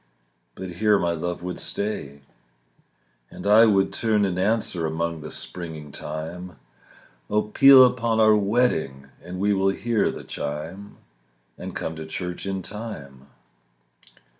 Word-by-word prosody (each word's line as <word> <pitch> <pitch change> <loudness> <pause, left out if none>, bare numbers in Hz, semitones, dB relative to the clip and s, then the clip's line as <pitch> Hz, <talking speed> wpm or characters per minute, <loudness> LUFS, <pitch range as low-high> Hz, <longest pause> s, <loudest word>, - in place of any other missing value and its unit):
But 90 -2 -8
here 105 0 +4
my 85 -3 0
love 85 +1 -4
would 90 0 -5
stay. 70 -9 -3 1.1
And - - -11
I 110 +3 +7
would 100 -2 +2
turn 110 -3 +1
and 90 -2 -2
answer 95 -5 0
Among 80 0 -3
the - - -7
springing 80 -4 -5
thyme, 80 +5 -7 0.7
"Oh, 105 +1 +2
peal 130 +4 +8
upon 115 -3 0
our 110 -1 +6
wedding, 100 - 0
And 90 +1 -7
we 100 +1 +2
will 95 0 +2
hear 115 +3 0
the - - -7
chime, 80 +8 -6 0.6
And - - -8
come 80 - -4
to 80 - -7
church 90 +3 -5
in 95 -1 -3
time." 70 - -8
95 Hz, 140 wpm, -24 LUFS, 80-105 Hz, 1.1 s, peal